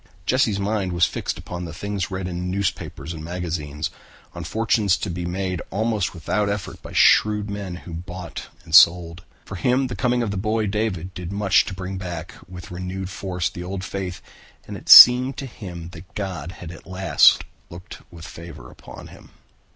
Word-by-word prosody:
Jesse's 110 -3 +1
mind 100 -2 -1
was 85 -1 +4
fixed - - -4
upon 90 0 -7
the 80 - -8
things 100 -1 -3
read 95 -1 -4
in 90 0 -4
newspapers 95 -2 -3
and 80 -1 -8
magazines, 80 -3 -4 0.4
on 85 - -7
fortunes 110 0 +1
to 100 - -4
be 85 0 -4
made 90 0 -3
almost 110 -3 -1
without 100 +6 -1
effort 100 -2 -5
by - - -10
shrewd 105 -1 +3
men 100 -3 -5
who 85 -1 -10
bought 90 0 -7 0.2
and 80 -3 -13
sold. 85 0 +5 0.2
For 100 - -7
him 125 +5 +1
the 125 - -5
coming 125 -1 0
of 110 - -2
the 100 - -3
boy 110 +2 0
David 100 -4 -2
did 90 0 -7
much 100 -1 +3
to 95 - -6
bring 95 0 -5
back 85 -2 -6 0.2
with 90 -1 -10
renewed 90 +1 -5
force 90 -2 -3
the 90 - -7
old 95 +1 -5
faith 95 -1 -5 0.4
and - - -7
it - - -11
seemed 125 +3 +10
to 140 - -5
him 90 -9 -9
that 90 +3 -14
God 90 -5 -5
had 85 -3 -9
at 85 - -13
last 95 0 +4 0.3
looked 85 +2 -11
with 85 -1 -12
favor 80 -7 -11
upon - - -12
him. - - -16
90 Hz, 185 wpm, -22 LUFS, 85-100 Hz, 0.4 s, seemed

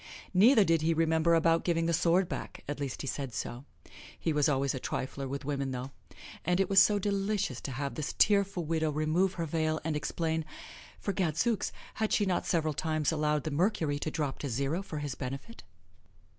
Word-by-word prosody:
Neither 215 +5 +6
did 165 -3 +2
he 165 +1 +2
remember 160 +1 +3
about 165 0 +3
giving 165 -2 +1
the 170 - +1
sword 175 +2 +3
back - - -6
at 145 0 -4
least 140 -3 -4
he - - -5
said 135 -1 -4
so. 125 +3 -5 0.5
He 165 - 0
was 150 0 +3
always 135 -1 +1
a 130 - -3
trifler 135 +2 -4
with 140 +1 -5
women, 140 -1 -2
though; 130 +1 -5 0.5
and 180 +2 +1
it 195 0 +1
was 195 -1 +8
so 210 - +4
delicious 200 - -1
to 135 - -5
have 140 +2 -3
this 155 - -4
tearful 200 -4 +3
widow 160 0 0
remove 155 +5 +1
her 170 - -2
veil 155 0 0
and 160 -1 -1
explain 160 +2 -1 0.6
for 200 - -2
gadzooks! 190 +6 0 0.2
had 220 -1 -1
she 205 - +3
not 185 -2 0
several 155 -3 +1
times 155 +1 0
allowed 150 -2 0
the 155 - -3
mercury 160 -3 +1
to 155 - -2
drop 150 -4 -3
to 140 - -3
zero 140 +8 -1
for 165 -5 -7
his 145 -3 -3
benefit? 135 - -6
160 Hz, 200 wpm, -30 LUFS, 145-180 Hz, 0.6 s, was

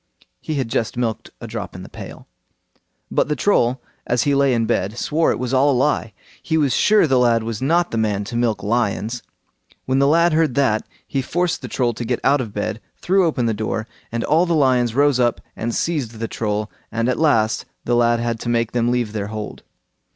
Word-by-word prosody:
He 155 - -3
had 135 -4 -1
just 115 -1 -2
milked 115 -3 -2
a - - -8
drop - - -6
in - - -8
the - - -9
pail. - - -10 0.8
But - - +2
the 150 - 0
Troll, 130 -8 +1 0.2
as 120 -1 +2
he 145 - +2
lay 140 -1 +3
in 115 -2 +1
bed, 110 -1 -1
swore 160 +6 +1
it - - -1
was 125 +1 -3
all 135 +2 +4
a - - +3
lie. 130 -5 +1 0.3
He 160 - 0
was 145 -4 +2
sure 210 -3 +4
the 130 -4 +3
lad 115 -2 +3
was 115 0 -4
not 170 +6 +2
the 115 - -1
man 105 -2 0
to 115 +4 -7
milk 115 -4 0
lions. 115 +1 -1 0.6
When 130 +1 +1
the 140 - +4
lad 170 +2 +4
heard 155 -5 +2
that, 125 -6 +1 0.2
he 135 - -1
forced 175 +6 -1
the - - -6
Troll 120 -2 0
to 115 - -5
get 120 +1 -1
out 140 0 +3
of 115 -4 -5
bed, 105 +2 -3 0.2
threw 190 -1 +3
open 130 -7 0
the 115 - +1
door, 110 +1 -3 0.2
and 115 0 -2
all 165 +4 +3
the 170 - +2
lions 125 -5 +2
rose 140 -2 +3
up 120 -2 +2 0.2
and 115 +1 -3
seized 145 -9 -1
the 115 +1 -3
Troll, 105 -1 -2 0.2
and 115 +1 0
at 125 - 0
last 115 -9 +2 0.2
the 120 - +2
lad 120 0 +3
had 115 -1 -2
to 120 - -4
make 115 -1 +1
them 120 -1 +1
leave 120 -3 0
their 100 -2 -3
hold. 105 0 -6
120 Hz, 225 wpm, -21 LUFS, 115-140 Hz, 0.8 s, all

